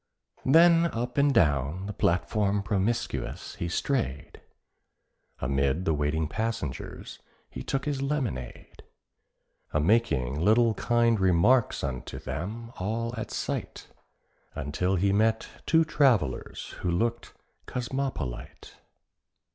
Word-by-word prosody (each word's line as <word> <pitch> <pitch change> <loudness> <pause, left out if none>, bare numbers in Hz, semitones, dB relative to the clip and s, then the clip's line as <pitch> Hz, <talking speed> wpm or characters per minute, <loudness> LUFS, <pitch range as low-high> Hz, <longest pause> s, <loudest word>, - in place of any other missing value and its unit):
Then 170 +3 +6
up 125 -1 -3
and 140 0 +4
down 75 - +2
the 105 - -5
platform 100 +3 +1
promiscuous 105 +4 -2
he 85 - -2
strayed, 85 - -2 1.0
Amid 70 +6 0
the 80 - +2
waiting 75 +2 0
passengers 110 - -4 0.3
he 65 - -6
took 135 - -2
his 145 -2 -2
lemonade, 130 - -4 0.9
A 75 - +2
making 75 - +2
little 110 +3 +4
kind 115 +1 +2
remarks 95 +7 +3
unto 65 -3 -4
them 115 +6 -5
all 115 +5 -2
at 110 -2 -5
sight, - - -4 0.7
Until 80 +7 -1
he 95 +2 +2
met 110 +2 +2 0.2
two 160 0 +4
travellers 125 - +1
who 90 - -2
looked 115 +7 -1 0.3
cosmopolite. 125 - -4
105 Hz, 105 wpm, -28 LUFS, 80-120 Hz, 1.0 s, Then